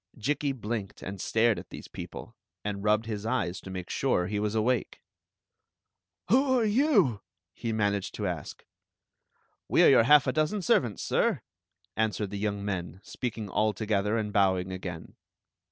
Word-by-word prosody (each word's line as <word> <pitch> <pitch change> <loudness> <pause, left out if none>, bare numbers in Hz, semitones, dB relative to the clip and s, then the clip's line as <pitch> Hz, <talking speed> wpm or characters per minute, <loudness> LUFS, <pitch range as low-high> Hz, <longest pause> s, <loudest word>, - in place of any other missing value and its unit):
Jikki 145 +4 0
blinked 110 -5 -5
and 95 -1 -6
stared 115 -1 +2
at - - -12
these - - -9
people, 115 - -9 0.3
and 100 -1 -3
rubbed 105 +1 +2
his 105 -2 -4
eyes 110 -6 -1
to - - -10
make 90 -2 -5
sure 90 - +1
he 105 +2 -2
was 105 +1 -1
awake. 115 +1 0 0.6
" - - -60
Who 260 +1 +4
are 225 - +2
you? 210 - +3 0.2
" 90 -1 -59
he 115 - -1
managed 100 -2 -1
to 105 - -3
ask. 85 -5 -5 0.5
" - - -45
We - - +5
are - - +8
your - - +6
half 145 +1 +7
a 130 - 0
dozen 155 +6 0
servants, 120 - +1
sir," - - +1 0.5
answered 110 -2 -1
the 100 - -4
young 100 -1 -2
men, 90 -3 -4
speaking 115 -4 -5
all 105 +2 +1
together 105 +1 0
and 105 -2 -2
bowing 95 -2 +2
again. 90 -3 -7
105 Hz, 170 wpm, -28 LUFS, 100-120 Hz, 0.6 s, are